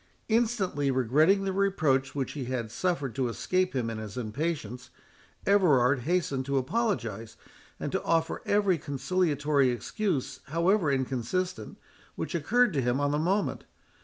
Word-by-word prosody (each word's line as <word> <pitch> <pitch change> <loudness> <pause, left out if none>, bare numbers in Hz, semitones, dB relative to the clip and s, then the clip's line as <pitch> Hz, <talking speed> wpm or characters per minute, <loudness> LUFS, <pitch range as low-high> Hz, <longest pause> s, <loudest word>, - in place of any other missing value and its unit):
Instantly 215 -11 +1
regretting 150 - +3
the 195 -1 -1
reproach 155 -10 +1
which 135 -2 -2
he 140 -4 -5
had 120 -3 -3
suffered 145 -3 -1
to 130 -2 0
escape 185 +8 -1
him 125 -3 0
in 115 -1 -4
his 110 0 -7
impatience, 125 0 -3 0.6
Everard 145 -10 +4
hastened 145 -2 0
to 140 0 +1
apologise, 130 - -2 0.4
and - - -3
to - - -1
offer 165 -1 0
every 200 -4 +2
conciliatory 145 -1 +1
excuse, 140 - -2
however 170 +2 +2
inconsistent, 130 +1 -2 0.4
which - - -4
occurred 225 +7 +2
to 140 - +1
him 125 +2 0
on 145 0 +1
the 150 - 0
moment. 190 +6 0
145 Hz, 140 wpm, -28 LUFS, 130-185 Hz, 0.6 s, Everard